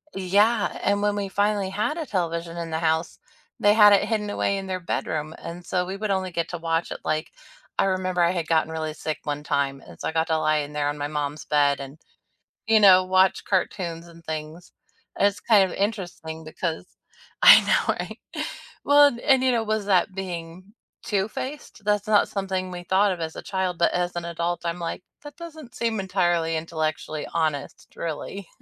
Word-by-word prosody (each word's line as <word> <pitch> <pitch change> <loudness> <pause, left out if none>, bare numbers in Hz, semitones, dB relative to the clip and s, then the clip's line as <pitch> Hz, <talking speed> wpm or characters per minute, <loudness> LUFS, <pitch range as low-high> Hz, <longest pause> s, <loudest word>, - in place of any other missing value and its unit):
Yeah, 205 +4 +2
and 200 0 +2
when 205 0 +1
we 200 -1 -2
finally 205 0 0
had 210 - -1
a 325 - -3
television 170 - -2
in 170 -1 -4
the 160 0 -2
house, 160 +1 0 0.4
they 205 0 +5
had 210 -1 +8
it 200 - +3
hidden 210 -2 -1
away 200 -1 0
in 195 0 -5
their 185 -1 -2
bedroom, 155 -2 -3
and 170 +1 -7
so 180 0 0
we 190 +2 -5
would 210 0 -2
only 190 -1 -1
get 170 0 -2
to 175 - -4
watch 165 0 -1
it, - - -5
like 155 +1 -2 0.5
I - - +4
remember 185 -1 0
I 170 - +3
had 170 -3 -3
gotten 160 -1 +2
really 160 -1 -3
sick 155 0 -4
one 145 0 -3
time, 140 -2 -1
and - - -14
so - - -3
I - - -1
got 160 0 0
to 160 - +1
lie 155 0 +2
in 145 0 -5
there 145 -1 0
on 145 - -4
my 145 0 -2
mom's 150 0 -4
bed 145 -1 +2
and, 140 +2 -9 0.7
you 220 0 +5
know, 185 -3 +7
watch 185 +1 +3
cartoons 175 -3 -2
and 170 0 -15
things, 160 +2 -6 0.5
and 200 - +5
it's 200 0 -3
kind 200 -5 +4
of - - -6
interesting 175 -6 -3
because 160 +1 -4 0.6
I - - +10
know, - - +2
right? - - -6 0.6
Well, 290 0 +7
and 240 -4 -3
and, 265 0 +3
you 260 - +4
know, 235 -2 +1
was 215 -1 -1
that 190 -1 +2
being 180 +1 -7 0.3
two-faced? 220 +5 -4
That's 210 0 +1
not 210 -1 +4
something 190 -2 -3
we 175 0 -7
thought 195 +3 +3
of 180 - -4
as 160 -1 -4
a - - -6
child, 190 -2 -2
but 170 - +3
as 175 0 -1
an 175 -1 -3
adult, 170 0 -2
I'm 170 +1 -2
like, 170 +1 -4 0.2
"That 290 -1 -10
doesn't 315 -7 -10
seem 230 -2 -1
entirely 175 -4 +1
intellectually 155 -1 -3
honest, 155 -4 -2
really." 170 +4 -5
180 Hz, 205 wpm, -24 LUFS, 160-205 Hz, 0.7 s, I